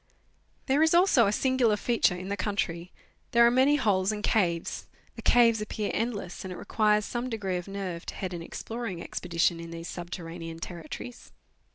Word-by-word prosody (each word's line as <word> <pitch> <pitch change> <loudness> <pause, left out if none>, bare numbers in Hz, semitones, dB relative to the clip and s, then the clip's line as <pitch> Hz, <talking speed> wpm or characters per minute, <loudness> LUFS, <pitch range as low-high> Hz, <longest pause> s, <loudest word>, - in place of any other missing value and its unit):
There 275 +3 +2
is 320 +1 +4
also 345 - +5
a - - +2
singular 245 -2 +2
feature 225 -4 +2
in 185 +2 -6
the 200 - -1
country. 185 -4 -2 0.4
There 235 0 +7
are 235 - +5
many 265 +4 +4
holes 200 -7 +2
and 210 -1 -5
caves; 170 -6 0 0.3
the - - -8
caves 230 -2 +4
appear 210 0 -3
endless, 210 -5 -3
and 190 - -6
it 180 - -6
requires 210 +1 +2
some 240 +1 -3
degree 195 -6 -2
of 175 - -6
nerve 190 -3 -5
to - - -5
head 185 -2 -4
an 170 - -5
exploring 225 +1 -5
expedition 170 0 0
in 170 0 -7
these 165 0 -7
subterranean 170 -2 -6
territories. 175 +8 -8
200 Hz, 180 wpm, -28 LUFS, 175-235 Hz, 0.4 s, There